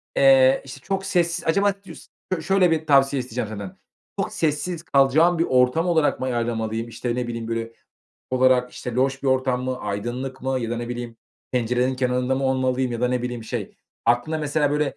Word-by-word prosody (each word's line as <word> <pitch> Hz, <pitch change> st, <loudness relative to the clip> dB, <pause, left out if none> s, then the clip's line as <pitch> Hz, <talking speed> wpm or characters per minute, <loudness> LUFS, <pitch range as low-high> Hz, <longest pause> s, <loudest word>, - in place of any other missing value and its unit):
eee, 135 Hz, -1 st, +6 dB
işte, 130 Hz, 0 st, -9 dB
çok 195 Hz, +4 st, -3 dB
sessiz 175 Hz, -3 st, 0 dB
acaba 200 Hz, +4 st, +3 dB
cus -, -, -12 dB, 0.3 s
şöyle 185 Hz, +1 st, +3 dB
bir 160 Hz, -1 st, -1 dB
tavsiye 135 Hz, -1 st, +4 dB
isteyeceğim 125 Hz, -2 st, -4 dB
senden. 100 Hz, -3 st, -7 dB, 0.4 s
Çok -, -, -2 dB
sessiz 165 Hz, +2 st, -1 dB
kalacağım 155 Hz, +5 st, +3 dB
bir 165 Hz, -, +4 dB
ortam 130 Hz, +7 st, +2 dB
olarak 160 Hz, -4 st, +2 dB
mı 130 Hz, -, -2 dB
ayarlamalıyım? 115 Hz, -2 st, -2 dB
İşte, 120 Hz, +1 st, -3 dB
ne 125 Hz, -1 st, -2 dB
bileyim, 115 Hz, -1 st, -5 dB
böyle, 115 Hz, 0 st, -3 dB, 0.6 s
olarak, 130 Hz, -1 st, +3 dB
işte 125 Hz, -, -6 dB
loş 135 Hz, +2 st, 0 dB
bir 140 Hz, -, 0 dB
ortam 130 Hz, -1 st, +1 dB
mı, 130 Hz, 0 st, -2 dB
aydınlık 120 Hz, +6 st, -4 dB
mı 130 Hz, 0 st, 0 dB
ya 115 Hz, -1 st, -3 dB
da 120 Hz, -, -2 dB
ne 120 Hz, 0 st, -4 dB
bileyim 120 Hz, -1 st, -6 dB, 0.4 s
pencerenin 125 Hz, +1 st, +1 dB
kenarında 125 Hz, 0 st, 0 dB
mı 135 Hz, +1 st, -2 dB
olmalıyım 130 Hz, -1 st, 0 dB
ya 115 Hz, -, -4 dB
da 125 Hz, -, +2 dB
ne 125 Hz, -1 st, -1 dB
bileyim 125 Hz, -2 st, -4 dB
şey -, -, -5 dB, 0.3 s
aklına 120 Hz, +7 st, +2 dB
mesela, 150 Hz, -1 st, 0 dB
böyle, 150 Hz, 0 st, 0 dB
130 Hz, 190 wpm, -23 LUFS, 120-145 Hz, 0.6 s, eee